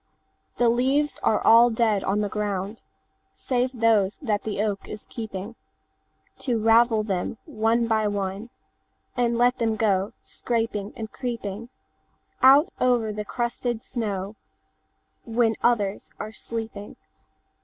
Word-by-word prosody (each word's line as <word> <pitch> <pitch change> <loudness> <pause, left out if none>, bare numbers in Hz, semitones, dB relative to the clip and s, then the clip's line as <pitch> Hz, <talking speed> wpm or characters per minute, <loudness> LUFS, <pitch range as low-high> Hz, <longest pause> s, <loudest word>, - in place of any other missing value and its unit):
The 240 - +3
leaves 265 +5 +1
are 215 - +2
all 230 +2 +6
dead 220 -3 +1
on 200 +2 0
the 205 - 0
ground, 205 0 -3 0.5
Save 250 0 0
those 225 -5 +2
that 215 -8 -1
the 215 -2 -4
oak 205 -2 -1
is 210 - -8
keepingTo 215 -1 -7 1.0
ravel 225 0 +4
them 195 0 -2
one 230 -4 +1
by 220 -1 +2
oneAnd 200 +2 -3 0.7
let 245 +1 +2
them 225 -2 +1
go 205 -1 +1
scraping 225 -3 -3
and 220 -3 -6
creepingOut 230 -3 -5 1.1
over 240 -4 +2
the 210 0 -4
crusted 240 0 -3
snow, 205 -4 -4 0.9
When 230 -1 +1
others 210 -5 +1
are 215 - -5
sleeping. 220 -2 -7
225 Hz, 115 wpm, -25 LUFS, 205-235 Hz, 1.1 s, all